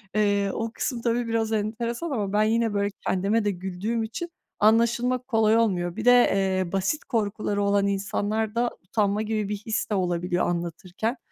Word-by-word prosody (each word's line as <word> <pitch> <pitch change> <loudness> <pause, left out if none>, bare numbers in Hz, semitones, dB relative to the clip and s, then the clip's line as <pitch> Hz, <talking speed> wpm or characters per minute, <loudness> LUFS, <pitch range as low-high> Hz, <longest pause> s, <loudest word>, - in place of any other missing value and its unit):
Eee, 205 -1 +2
o 225 0 -3
kısım 240 -1 -3
tabii 235 0 0
biraz 225 -1 0
enteresan 230 +8 -2
ama 205 -5 -2
ben 210 +1 +4
yine 225 0 +1
böyle 200 0 0 0.2
kendime 200 +4 +1
de 205 - +2
güldüğüm 190 +5 -3
için 245 +11 -5 0.3
anlaşılmak 235 +3 +2
kolay 225 -2 +3
olmuyor. 180 -6 +1
Bir 225 +1 -5
de, 245 - +8 0.2
eee, 190 -2 0
basit 195 +10 -1
korkuları 210 -2 -1
olan 200 0 +2
insanlarda 215 +4 -1
utanma 205 +2 0
gibi 215 -2 -2
bir 210 - -1
his 215 +2 -2
de 210 - 0
olabiliyor 175 -1 0
anlatırken. 175 - -3
215 Hz, 165 wpm, -25 LUFS, 195-230 Hz, 0.3 s, de